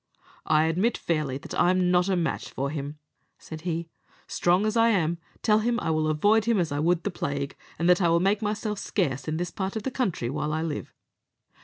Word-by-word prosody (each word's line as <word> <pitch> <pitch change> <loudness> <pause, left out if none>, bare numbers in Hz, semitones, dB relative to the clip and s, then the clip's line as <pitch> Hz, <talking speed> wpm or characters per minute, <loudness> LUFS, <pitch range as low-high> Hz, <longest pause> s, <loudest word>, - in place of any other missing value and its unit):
"I 155 0 +4
admit 180 +9 +1
fairly 150 -5 -1
that - - -9
I'm 180 0 +3
not 180 +1 +3
a 190 - +2
match 170 -2 -2
for 140 +1 -3
him," 145 0 -5 0.4
said 160 -1 -9
he, 170 -1 -3 0.4
"strong 180 +4 +2
as 215 +1 0
I 230 0 +5
am; 170 -5 +1 0.2
tell 215 -1 +4
him 235 +2 0
I 165 - -1
will 155 0 +1
avoid 205 +8 +3
him 230 -2 +2
as 170 -5 0
I 145 - -1
would 170 +2 +2
the 205 - -1
plague, 140 -4 -3 0.2
and 170 - 0
that 180 +2 +5
I 170 - +4
will 170 +1 +4
make 200 +4 +2
myself 210 0 -2
scarce 140 - -1
in 155 0 -1
this 175 0 -3
part 190 +1 -3
of 220 - -3
the 265 - -2
country 180 - -1
while 150 +1 -2
I 160 +1 -1
live." 155 -3 -4
175 Hz, 220 wpm, -26 LUFS, 155-205 Hz, 0.4 s, I